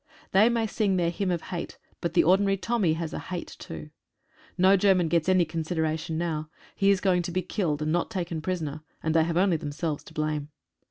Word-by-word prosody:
They 205 +4 +6
may 230 -1 +1
sing 210 -2 0
their 170 -1 +1
Hymn 190 +2 -2
of 175 -2 -1
Hate, 175 -2 -5 0.2
but 170 0 -2
the - - +6
ordinary 195 +3 +3
Tommy 200 -5 +1
has 160 0 -4
a - - -3
Hate 180 -2 -6
too. 75 -2 -8 0.7
No 190 +2 +6
German 185 -3 +3
gets 170 +1 +2
any 185 -2 +4
consideration 160 0 -2
now. 155 -2 -2 0.3
He 195 -1 +3
is 200 -1 +4
going 185 -2 +3
to 175 0 -4
be 185 +1 -1
killed, 160 -6 -1
and 155 - 0
not 175 +1 0
taken 175 -6 -3
prisoner, 155 -4 -3 0.2
and 160 - +1
they 160 -1 +4
have 170 0 -1
only 185 -2 +3
themselves 150 +1 -3
to - - -13
blame. 150 -1 -2
170 Hz, 210 wpm, -27 LUFS, 160-190 Hz, 0.7 s, They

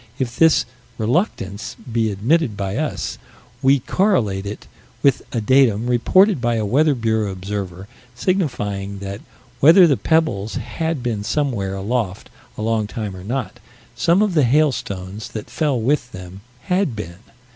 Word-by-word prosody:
If 120 -3 -3
this 160 -1 +5 0.3
"reluctance" 110 - -1
be 115 -2 -2
admitted 115 - +1
by 100 0 -3
us, 155 +1 -3 0.4
we 135 0 +4
correlate 115 - +1
it 105 - -7 0.4
with 140 -3 +4
a 120 - -1
datum 120 -2 +3
reported 155 - +3
by 120 -1 +1
a 110 -2 -1
Weather 145 +7 +3
Bureau 110 -3 0
observer, 95 -1 -5 0.3
signifying 105 - -2
that, 100 +1 -6 0.4
whether 165 +8 +8
the 145 -6 +3
pebbles 135 -11 0
had 160 -5 -3
been 110 -4 -2
somewhere 110 -6 -1
aloft 100 -1 -3 0.3
a 110 - -4
long 110 -1 0
time 105 -3 -5
or 90 - -9
not, 115 -2 -4 0.3
some 170 - +3
of 205 -3 0
the 155 -4 +4
hailstones 110 -8 0
that 110 - -7
fell 145 -6 0
with 125 +1 0
them, 95 +1 -9 0.2
had 180 - 0
been. 85 -4 -7
115 Hz, 145 wpm, -20 LUFS, 100-145 Hz, 0.4 s, whether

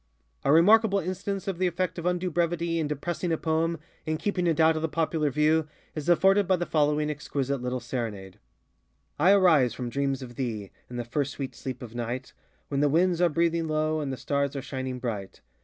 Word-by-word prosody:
A 140 - +3
remarkable 200 +6 +6
instance 195 +2 -3
of 190 -3 -2
the 185 - +3
effect 180 0 -2
of 170 - -2
undue 180 0 0
brevity 170 0 0
in 155 - 0
depressing 170 +4 -3
a 160 - +1
poem, 165 +1 0 0.3
in 155 0 -1
keeping 180 -1 -1
it 165 -2 +1
out 160 0 +5
of 155 - -2
the 160 - -1
popular 160 -1 0
view, 155 +2 +2 0.3
is 155 +1 -4
afforded 195 +3 +4
by 190 - +4
the 175 -1 -2
following 150 -1 +1
exquisite 140 -2 -3
little 125 0 -2
SerenadeŌĆö 115 -6 -5 0.9
I 175 +6 +6
arise 160 - +4
from 125 -2 -4
dreams 135 0 -1
of 120 -2 -10
thee 110 -7 -3 0.2
In 125 - -8
the 120 -1 -3
first 135 +3 -2
sweet 135 -2 -5
sleep 130 -2 -6
of 115 -2 -9
night, 120 +2 -4 0.4
When 140 - -1
the 145 0 +3
winds 175 +3 +2
are 175 - +5
breathing 165 +1 +1
low, 155 0 0
And 145 -3 -3
the 130 - -4
stars 140 +3 -1
are 140 - -3
shining 130 -2 -4
bright. 110 -6 -5
155 Hz, 205 wpm, -27 LUFS, 130-170 Hz, 0.9 s, remarkable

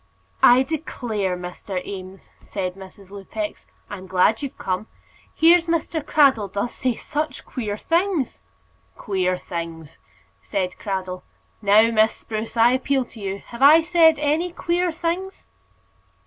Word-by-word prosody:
"I 250 +2 +7
declare, 230 - -3
Mr. 180 +1 -6
Eames," 190 -1 -9
said 185 -2 -4
Mrs. 190 0 -14
Lupex, 205 - -6 0.2
"I'm 190 -2 -8
glad 190 +4 +2
you've 280 -2 -6
come. 190 +3 -3 0.5
Here's 335 +1 +5
Mr. 330 -1 -1
Cradell 265 -12 +3
does 205 +5 -2
say 255 -2 -1
such 305 +5 -4
queer 210 -5 -4
things." 335 - 0 0.6
"Queer 185 -2 -1
things!" 165 -4 -7 0.4
said 180 - -3
Cradell. 185 -3 -4 0.4
"Now, 215 +2 +5
Miss 220 0 +3
Spruce, 220 +1 -6
I 230 +1 +6
appeal 260 0 +1
to 235 - -14
you 195 -1 -5
Have 235 +2 -9
I 305 +4 +8
said 325 -1 +4
any 305 +4 0
queer 350 +1 0
things?" 345 +4 -4
225 Hz, 135 wpm, -22 LUFS, 190-310 Hz, 0.6 s, I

